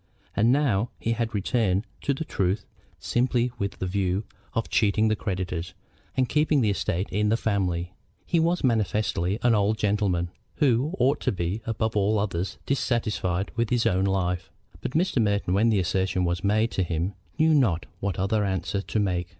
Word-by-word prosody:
And 115 +3 +4
now 120 -6 +2
he 115 - -1
had 115 -1 -1
returned 100 -1 +1 0.2
to 140 - 0
the 160 - -4
truth 95 -5 -1 0.3
simply 125 0 +1
with 100 -1 -2
the - - -3
view 95 +1 0 0.3
of 115 - 0
cheating 110 +1 +2
the 110 - +2
creditors 90 -4 -4 0.4
and 130 -1 +3
keeping 150 0 +2
the 105 -3 +3
estate 95 -1 -1
in 105 +2 +1
the 115 - +3
family. 90 -5 -1 0.3
He 170 - +2
was 170 +2 +1
manifestly 105 -5 +1
an 120 -1 +5
old 105 +1 +2
gentleman 100 -5 0 0.2
who 140 +4 +2
ought 140 +3 +2
to - - +1
be, 90 +3 -2
above 110 -1 -1
all 105 +1 +2
others, 95 -3 -2
dissatisfied 105 -8 0
with 115 -1 0
his 120 -2 +1
own 95 -4 +2
life; 90 -1 -1 0.3
but - - -4
Mr. 160 -6 +2
Merton, 100 -4 +1
when 110 +4 +4
the 110 - +3
assertion 95 +1 0
was 85 -1 -1
made 110 +3 +2
to - - 0
him, 85 +2 -1 0.2
knew 160 0 +4
not 110 - +2
what 100 -1 -2
other 105 +3 +1
answer 100 0 -1
to 105 - -2
make. 90 -3 0
105 Hz, 180 wpm, -26 LUFS, 95-115 Hz, 0.4 s, an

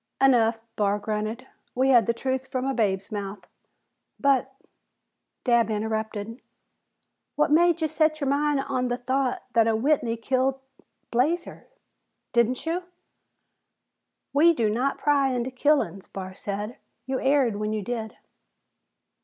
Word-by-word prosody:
"Enough," 235 -4 +4 0.2
Barr 205 -1 +1
grunted. 215 +4 -3 0.3
"We 260 +2 +2
had 240 -5 +5
the 235 - +2
truth 260 +2 -2
from 255 0 -3
a 270 - 0
babe's 200 -5 0
mouth." 205 -1 -6 0.7
"But 270 -2 +2 0.5
" - - -55
Dabb 235 -2 +3
interrupted. 220 +1 -3 0.9
"What 300 - +2
made 340 +1 +4
ye - - +3
set 310 +1 +1
your 280 - -1
mind 285 0 +1
on 255 -2 -1
the 245 0 -1
thought 260 +1 -1
that 230 -1 +4
a 225 - +2
Whitney 235 -1 +1
kil't 260 +3 0 0.5
Blazer?" 305 +9 -1 0.7
"Didn't 240 +3 +1
you?" 335 +3 -1 1.5
"We 325 +4 +6
do 220 -5 +1
not 255 +5 0
pry 280 -3 +2
into 250 +1 -2
killin's," 255 -7 +1
Barr 190 -1 -7
said. 205 +4 -5 0.3
"You 260 0 -2
erred 265 -6 +2
when 210 0 -2
you 215 -1 -2
did." 225 0 -5
250 Hz, 135 wpm, -25 LUFS, 220-275 Hz, 1.5 s, We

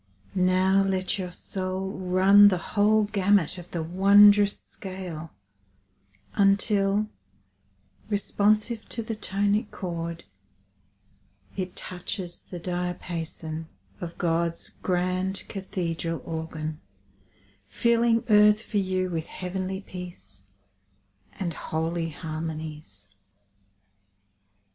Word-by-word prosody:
Now 185 +1 +3
let 190 0 0
your 180 -1 -3
soul 185 +1 -3
run 190 +2 +6
the 190 -3 +3 0.2
whole 215 +1 +4
gamut 200 -4 +2
of 175 - -11
the 170 -2 -3
wondrous 200 +3 +6
scale 180 -4 -7 1.0
Until, 200 0 +3 1.0
responsive 215 +2 +1
to 230 - -2
the 225 - -4
tonic 205 +1 0
chord, 170 -2 -5 1.3
It 185 -2 -4
touches 180 0 -4
the 180 - -9
diapason 170 -2 -4 0.3
of 170 -1 -7
God's 170 0 0
grand 185 +1 0
cathedral 170 -4 -3
organ, 160 -1 -5 0.9
Filling 235 - +2
earth 210 -1 +6
for 210 - -3
you 185 -1 -1
with 165 -2 -3
heavenly 190 +1 -4
peace 105 - -9 0.9
And 175 -4 -3
holy 165 +2 -2
harmonies. 155 - -6
185 Hz, 90 wpm, -26 LUFS, 170-200 Hz, 1.3 s, run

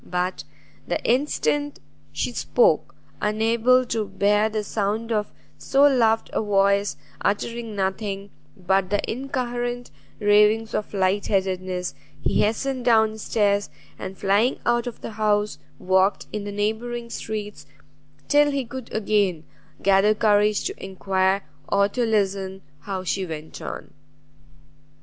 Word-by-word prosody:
But 180 +1 -2 0.4
the - - 0
instant 290 +2 0 0.3
she - - -2
spoke, 485 0 +2 0.3
unable 225 +4 +3
to 225 -2 -1
bear 210 +2 +2
the 215 -1 -2
sound 215 +3 -2
of 210 -2 0 0.3
so 275 +1 +2
loved 230 -6 +3
a - - +1
voice 200 -1 +2 0.2
uttering 230 +2 -2
nothing 195 0 -3 0.3
but 190 0 +1
the 205 +1 +1
incoherent 245 -1 -3 0.3
ravings 210 +1 +4
of 210 - -3
lightheadedness, 185 -2 0 0.3
he - - +1
hastened 255 +4 0
down 220 -2 +3
stairs, 205 -2 +1 0.3
and 190 0 -6
flying 205 +6 +2
out 240 0 +2
of 240 - -7
the - - -6
house, 210 -1 0 0.2
walked 190 +1 +2
in 210 -1 -3
the 205 - -4
neighbouring 230 +3 -2
streets, 210 -11 -5 0.6
till 290 0 +5
he 280 -2 -1
could 255 0 -8
again 200 -6 +1 0.4
gather 200 +2 +4
courage 210 -1 +3
to - - -5
enquire 190 0 0 0.3
or 200 0 +4
to 245 +4 -1
listen 195 -3 -1 0.2
how 190 +2 -5
she 190 +1 -1
went 160 -3 -7
on. - - -7
210 Hz, 125 wpm, -24 LUFS, 195-230 Hz, 0.6 s, till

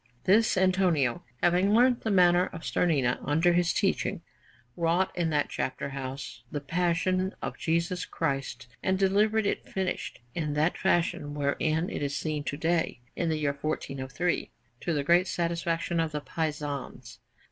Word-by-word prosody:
This 215 +3 +4
Antonio, 185 -9 +2 0.2
having 180 +4 +4
learnt 245 +1 +4
the 220 - -2
manner 180 -2 +5
of 165 - -9
Starnina 140 -8 +1
under 160 +5 +3
his 175 0 +3
teaching, - - 0 0.5
wrought 170 +2 +1
in 170 -2 0
that 150 -2 +1
chapter 130 - -3
house 135 -2 -6
the 145 - -2
Passion 180 +4 0
of - - -4
Jesus 170 +2 0
Christ, 135 -4 -3 0.2
and 190 0 +1
delivered 205 +3 +3
it - - -2
finished 190 -1 -3
in 150 -3 -2
that 155 +3 +2
fashion 150 -4 0
wherein 155 +3 0
it - - -4
is 145 0 -1
seen 155 -2 -2
to 145 - -3
day, 160 -4 0 0.2
in 170 - -1
the 160 - 0
year 145 -2 0
1403, 140 +2 -2 0.3
to 175 - -2
the 145 -3 0
great 175 +5 +4
satisfaction 170 0 -1
of 160 -1 0
the 150 - -1
Pisans. 145 -3 -4
165 Hz, 155 wpm, -28 LUFS, 145-180 Hz, 0.5 s, manner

